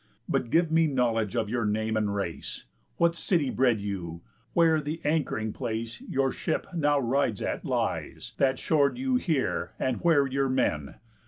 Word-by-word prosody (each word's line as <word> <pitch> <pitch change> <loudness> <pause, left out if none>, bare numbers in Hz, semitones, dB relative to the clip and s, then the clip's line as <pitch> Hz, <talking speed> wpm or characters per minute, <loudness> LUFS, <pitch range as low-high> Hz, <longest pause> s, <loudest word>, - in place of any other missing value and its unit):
But 120 - 0
give 165 +4 +3
me 165 0 +4
knowledge 115 -6 0
of 115 -3 0
your 120 +2 -1
name 110 +1 0
and 105 -2 0
race. 95 -5 -4 0.3
What 170 0 +3
city 165 -6 +1
bred 125 -4 +2
you? 90 -5 -5 0.3
Where 165 -2 +4
the 150 +3 -4
anchoring 145 -8 0
place 115 +1 -4
Your 135 0 0
ship - - -2
now 145 -3 +2
rides 130 -4 0
at - - -2
lies - - -2
that 135 -1 +3
shor'd 145 +3 +2
you 260 0 +1
here 160 - -1
And 130 -2 0
where 160 -5 +3
your 135 0 0
men? 75 - 0
130 Hz, 165 wpm, -28 LUFS, 110-155 Hz, 0.3 s, me